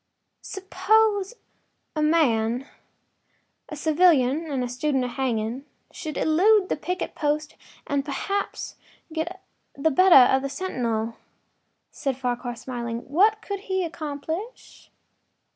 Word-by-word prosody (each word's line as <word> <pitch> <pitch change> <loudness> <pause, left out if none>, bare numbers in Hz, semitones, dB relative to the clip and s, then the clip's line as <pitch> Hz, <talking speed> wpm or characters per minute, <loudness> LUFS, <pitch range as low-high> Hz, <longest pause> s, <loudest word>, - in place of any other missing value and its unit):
” - - -53
“Suppose 410 +2 +2 0.6
a 305 - 0
man—a 270 0 -2
civilian 310 -2 +3
and 250 -3 -2
student 265 +1 0
of 250 - -3
hanging—should 265 - -4
elude 375 +5 +4
the - - +1
picket 360 +5 -4
post 300 0 -1 0.3
and 280 -1 0
perhaps 395 +8 -3 0.4
get 340 +4 -4 0.3
the 315 +3 +1
better 285 -6 +7
of 265 - +1
the 275 - -3
sentinel,” 235 -10 -2 0.7
said 270 -3 -3
Farquhar, 245 -1 -3
smiling, 235 -1 -5
“what 425 +7 +3
could 400 -1 -4
he 380 -1 +1
accomplish? 320 - -6
300 Hz, 110 wpm, -25 LUFS, 255-370 Hz, 0.7 s, better